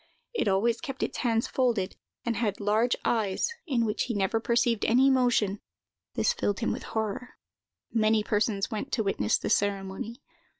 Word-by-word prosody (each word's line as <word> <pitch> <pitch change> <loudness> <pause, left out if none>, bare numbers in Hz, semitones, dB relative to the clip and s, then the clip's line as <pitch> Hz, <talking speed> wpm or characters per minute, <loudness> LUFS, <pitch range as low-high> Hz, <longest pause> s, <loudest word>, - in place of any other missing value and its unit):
It 460 - 0
always 215 +4 +2
kept 270 -4 -4
its - - -3
hands 230 -2 +1
folded, 235 -8 0 0.3
and 235 -1 0
had 215 -4 -1
large 215 +4 +2
eyes, 220 - +1
in 240 -5 +1
which 210 - -1
he 240 - -3
never 200 +3 +1
perceived 235 -1 +1
any 260 +4 +5
motion; 240 -6 +2 0.6
this - - +2
filled 220 - -1
him 230 - +1
with - - -3 0.2
horror. 220 +3 -3 0.6
Many 220 -1 +3
persons 210 -1 0
went 220 +6 -4
to 220 - +1
witness 150 - +1
the - - -3
ceremony. 200 +3 -1
225 Hz, 165 wpm, -28 LUFS, 205-240 Hz, 0.6 s, any